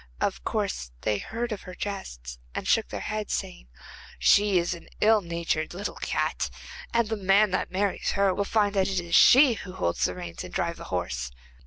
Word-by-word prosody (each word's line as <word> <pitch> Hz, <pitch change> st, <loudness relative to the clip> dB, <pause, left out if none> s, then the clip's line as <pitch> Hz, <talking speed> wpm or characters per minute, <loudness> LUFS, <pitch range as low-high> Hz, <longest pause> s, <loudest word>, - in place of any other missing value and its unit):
Of 60 Hz, -, -1 dB
course -, -, -2 dB
they 105 Hz, -2 st, 0 dB
heard 235 Hz, -, -4 dB
of 210 Hz, -, -4 dB
her 180 Hz, -1 st, -10 dB
jests, 60 Hz, -, -6 dB, 0.2 s
and -, -, -3 dB
shook -, -, +3 dB
their -, -, -5 dB
heads 215 Hz, -1 st, -2 dB
saying: 185 Hz, -, -6 dB, 0.5 s
'She 205 Hz, -2 st, +4 dB
is 175 Hz, +1 st, +1 dB
an 170 Hz, -, -11 dB
ill 215 Hz, 0 st, +5 dB
natured 170 Hz, -2 st, -2 dB
little 200 Hz, +3 st, -4 dB
cat, -, -, -1 dB, 0.4 s
and 235 Hz, -1 st, +2 dB
the 220 Hz, -, -1 dB
man 200 Hz, +1 st, +3 dB
that 185 Hz, -, -1 dB
marries 195 Hz, +1 st, -1 dB
her 195 Hz, -1 st, +3 dB
will 200 Hz, -, 0 dB
find 205 Hz, 0 st, +1 dB
that 195 Hz, -2 st, +2 dB
it 190 Hz, -1 st, 0 dB
is 170 Hz, -1 st, -7 dB
she 265 Hz, -1 st, +8 dB
who 205 Hz, -, -8 dB
will 185 Hz, -, -9 dB
hold 85 Hz, -, 0 dB
the 90 Hz, -, 0 dB
reins 85 Hz, -2 st, -7 dB
and -, -, -9 dB
drive -, -, -1 dB
the -, -, -9 dB
horse. 60 Hz, -1 st, -3 dB
190 Hz, 205 wpm, -27 LUFS, -, 0.5 s, she